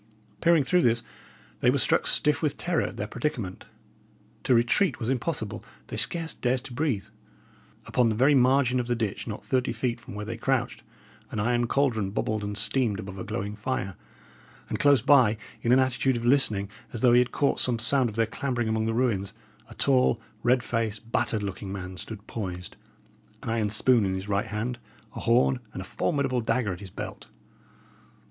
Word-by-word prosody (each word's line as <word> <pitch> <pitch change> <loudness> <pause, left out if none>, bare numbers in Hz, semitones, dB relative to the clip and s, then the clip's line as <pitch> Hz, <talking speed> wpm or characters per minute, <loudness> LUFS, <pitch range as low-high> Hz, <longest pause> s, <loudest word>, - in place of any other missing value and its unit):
Peering 170 -3 +5
through 180 +6 +3
this, 120 -4 +2 0.6
they - - +3
were - - +3
struck - - +2
stiff 150 -1 +2
with 155 -3 0
terror 175 -2 0
at - - -6
their - - -2
predicament. 115 -11 -4 0.8
To 125 - +4
retreat 120 - +2
was 120 +1 -1
impossible; 130 -4 -2 0.3
they - - -5
scarce 165 -2 0
dared 125 0 0
to 130 - -8
breathe. 125 -8 -1 0.8
Upon 125 -2 +2
the 110 - 0
very 130 +6 +4
margin 130 -1 +4
of 120 - -2
the 120 - +1
ditch, 110 -2 -3
not 105 -2 -6
thirty 130 -1 0
feet 120 -2 -2
from 115 - -10
where 105 0 -5
they 115 +2 -5
crouched, 125 0 -1 0.5
an 110 - -4
iron 120 +2 +1
caldron 115 -7 +1
bubbled 105 +1 -2
and 105 0 -4
steamed 110 0 +1
above 95 -2 -7
a - - -4
glowing 100 +2 -4
fire; 105 -4 -3 0.7
and - - -3
close 140 -5 +4
by, 125 -7 +5 0.2
in 120 - +1
an 125 - +7
attitude 130 0 +2
of 115 - -4
listening, 120 -7 +3 0.3
as 115 - -4
though 125 -2 +5
he 120 - +7
had 125 -1 +1
caught 140 - +1
some 125 -2 +2
sound 125 +2 +2
of 105 - -9
their 115 0 +2
clambering 120 +1 -2
among 110 0 0
the 115 - -1
ruins, 105 -5 0 0.4
a - - -12
tall, 130 -4 +3 0.2
red 120 +1 +3
faced, 115 -1 -2
battered 110 -3 0
looking 95 0 -5
man 95 -1 -6
stood 105 +3 -8
poised, 90 -5 -6 0.7
an - - -3
iron 110 -2 0
spoon 115 +2 +3
in 95 -1 0
his 95 +1 -5
right 100 +2 0
hand, 115 +4 -3 0.4
a - - -5
horn 125 +2 +3
and - - -6
a 95 - -6
formidable 135 - 0
dagger 110 -3 0
at 90 - -8
his 100 -2 -8
belt. - - -7
120 Hz, 195 wpm, -27 LUFS, 105-130 Hz, 0.8 s, an